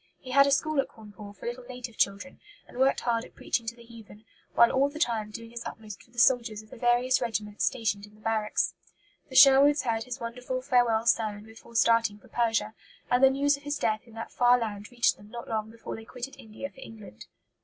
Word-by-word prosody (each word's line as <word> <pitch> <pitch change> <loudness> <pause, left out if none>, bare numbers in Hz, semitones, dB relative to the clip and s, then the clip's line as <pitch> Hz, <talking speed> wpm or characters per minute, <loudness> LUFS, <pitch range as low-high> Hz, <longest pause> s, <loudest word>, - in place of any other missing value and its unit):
He 255 - -9
had 275 +1 +6
a - - +2
school 310 +1 +1
at - - -7
Cawnpore 205 -2 -12
for - - -12
little 240 +1 -5
native 250 -2 -8
children; 200 +7 -1 0.3
and - - -11
worked 265 +1 +3
hard 230 -1 0
at - - -15
preaching 230 -2 -2
to 235 - -3
the 235 - -15
heathen; 225 -2 -14 0.3
while 235 0 +6
all 275 +2 +2
the 295 - -10
time 230 -8 0
doing 230 +2 -9
his 235 0 -7
utmost 210 -4 -9
for - - -21
the 240 - -23
soldiers 235 -4 +3
of 215 - -21
the - - -9
various 245 +2 +2
regiments 210 -3 -2
stationed 210 -5 -1
in 210 - -20
the - - -21
barracks. 220 -1 0 0.6
The - - -10
Sherwoods 280 +2 +7
heard 225 -2 -1
his 250 +1 -6
wonderful 250 +2 -5
farewell 240 -3 +2
sermon 215 -3 +1
before 225 +1 -15
starting 230 -2 +3
for - - -20
Persia; 225 -2 0 0.4
and 245 +2 +3
the 265 - +9
news 280 +1 +2
of - - -17
his 290 0 -3
death 215 +2 -1
in 230 - -16
that 225 - -7
far 245 0 +4
land 210 -3 -5
reached 240 -1 +2
them 205 - -16
not 235 +1 -8
long 220 -1 -2
before 230 0 -8
they 225 - -9
quitted 250 +3 -7
India 220 +5 -7
for - - -18
England. 215 - -12
230 Hz, 230 wpm, -28 LUFS, 215-250 Hz, 0.6 s, the